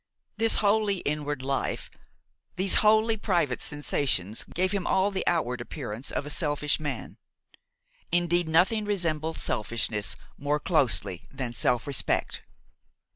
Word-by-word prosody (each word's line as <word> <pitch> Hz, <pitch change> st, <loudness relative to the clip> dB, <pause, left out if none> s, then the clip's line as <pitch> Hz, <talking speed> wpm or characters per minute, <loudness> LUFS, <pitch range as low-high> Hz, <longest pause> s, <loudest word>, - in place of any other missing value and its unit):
This 225 Hz, 0 st, +4 dB
wholly 205 Hz, -1 st, +3 dB
inward 145 Hz, -2 st, -2 dB
life, 135 Hz, 0 st, -2 dB, 0.6 s
these 190 Hz, +1 st, +2 dB
wholly 220 Hz, +1 st, +4 dB
private 170 Hz, -, 0 dB
sensations 135 Hz, -8 st, 0 dB
gave 185 Hz, +2 st, -1 dB
him 200 Hz, -3 st, -2 dB
all 190 Hz, +2 st, +2 dB
the 190 Hz, -, -2 dB
outward 125 Hz, -8 st, 0 dB
appearance 120 Hz, -2 st, -6 dB
of 140 Hz, -, -3 dB
a -, -, -6 dB
selfish 150 Hz, -1 st, 0 dB
man; 150 Hz, -1 st, -5 dB, 0.9 s
indeed 175 Hz, -1 st, +2 dB
nothing 190 Hz, +7 st, +3 dB
resembles 165 Hz, -6 st, -1 dB
selfishness 105 Hz, -1 st, -1 dB, 0.2 s
more 145 Hz, +1 st, 0 dB
closely 120 Hz, -, +1 dB
than 130 Hz, -3 st, -4 dB
self 120 Hz, +1 st, +1 dB
respect. 140 Hz, -2 st, 0 dB
150 Hz, 125 wpm, -27 LUFS, 130-190 Hz, 0.9 s, This